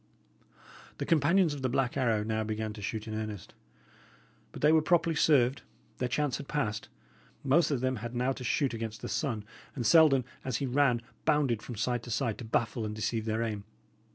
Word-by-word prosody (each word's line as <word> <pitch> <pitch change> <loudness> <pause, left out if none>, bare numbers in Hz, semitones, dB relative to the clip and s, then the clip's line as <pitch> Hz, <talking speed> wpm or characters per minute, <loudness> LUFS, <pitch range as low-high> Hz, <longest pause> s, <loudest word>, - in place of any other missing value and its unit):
The - - -3
companions 165 +2 +3
of 145 - -6
the 130 - 0
Black 125 -1 0
Arrow 115 -6 +1
now 110 0 -1
began 110 0 -3
to 105 - -9
shoot 110 +2 -4
in 110 - -5
earnest. 110 -3 -5 1.0
But - - -9
they 150 - +6
were 160 0 +5
properly 165 0 +2
served; 135 -4 +3 0.4
their 125 - -1
chance 140 +1 0
had - - -8
past; 110 -8 -2 0.5
most 145 +5 +3
of 140 -5 -1
them 130 -1 0
had 120 +2 -6
now 125 +2 +1
to 130 - -5
shoot 130 +2 +1
against 115 -1 -5
the - - -3
sun; 120 -10 -2 0.3
and 125 -4 -3
Selden, 140 -3 +6 0.2
as 130 -3 -1
he 140 - -2
ran, 125 -2 +2 0.2
bounded 145 -8 +2
from 120 - -7
side 120 +3 -1
to 120 - -10
side 115 -2 -1
to - - -6
baffle 115 0 -1
and 105 0 -4
deceive 110 +1 -2
their 110 +1 0
aim. 105 -3 -3
120 Hz, 200 wpm, -30 LUFS, 110-140 Hz, 1.0 s, they